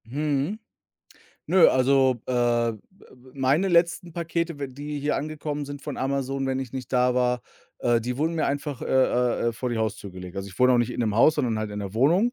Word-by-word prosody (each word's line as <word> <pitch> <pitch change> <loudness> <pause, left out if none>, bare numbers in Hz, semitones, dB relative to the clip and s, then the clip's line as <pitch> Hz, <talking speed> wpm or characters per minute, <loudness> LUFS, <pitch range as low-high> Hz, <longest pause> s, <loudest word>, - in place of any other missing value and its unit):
Mhm. 145 - -1 0.9
Nö, 185 -3 +6
also, 130 -1 +3
äh, 120 -2 +2
m - - -1 0.3
äh, - - -18 0.2
meine 140 +8 +2
letzten 170 0 +2
Pakete, 170 -1 -2
w 140 - -3
die 145 +3 -6
hier 145 +1 0
angekommen 150 -1 -4
sind 145 0 -8
von 145 - -5
Amazon, 135 0 -2
wenn 130 0 -1
ich 130 -3 -6
nicht 130 -2 -7
da 125 -1 +3
war, 125 -1 +1 0.4
äh, 120 -1 +2
die 125 +2 -3
wurden 160 +4 0
mir 160 - 0
einfach, 145 -1 -3
äh, - - -3
äh, 125 -2 +2
äh, - - -1
vor 125 +2 -4
die 120 - -2
Haustür 110 -2 -3
gelegt. 90 0 -9
Also, 95 0 -4
ich 95 - -14
wohne 125 0 +5
auch 125 - +4
nicht 120 0 +1
in - - -4
'nem 110 -3 0
Haus, 135 +8 +5
sondern 120 -7 0
halt 110 -1 -3
in 105 - -5
'ner 100 -1 -6
Wohnung, 170 - +3
130 Hz, 225 wpm, -25 LUFS, 120-150 Hz, 0.9 s, Nö